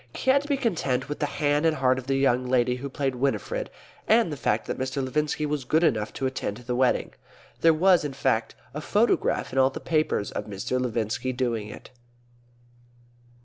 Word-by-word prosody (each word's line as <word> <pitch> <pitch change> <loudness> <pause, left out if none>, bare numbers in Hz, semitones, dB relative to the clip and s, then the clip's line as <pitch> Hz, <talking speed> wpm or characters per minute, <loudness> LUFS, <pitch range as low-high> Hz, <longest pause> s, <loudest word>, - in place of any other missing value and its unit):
He 260 - +2
had 280 +1 +4
to 290 - -10
be 285 -2 +1
content 175 - -1
with 150 - -5
the 145 - 0
hand 145 +1 0
and 160 -1 +3
heart 130 -2 +2
of 130 - -11
the 135 0 +2
lady 125 0 +1
who 140 +2 -6
played 135 -1 -2
Winifred, 140 - -2 0.4
and 220 -6 +4
the - - -3
fact 115 -5 0
that - - -4
Mr. 130 +1 -2
Levinski 150 +3 -1
was 150 -2 -2
good 160 +6 +2
enough 110 -10 +1
to 135 - -3
attend 130 -5 -3
the 125 0 -4
wedding. 130 0 +1 0.5
There 165 - +5
was, 175 +2 +4
in 145 -2 -4
fact, 125 -4 0 0.2
a 150 - -5
photograph 210 - +1
in 135 - +1
all 130 0 +5
the 135 - -7
papers 155 -10 0
of - - -4
Mr. 120 +5 -3
Levinski 120 +1 -2
doing 115 -5 -1
it. - - -11
135 Hz, 195 wpm, -26 LUFS, 125-155 Hz, 0.5 s, There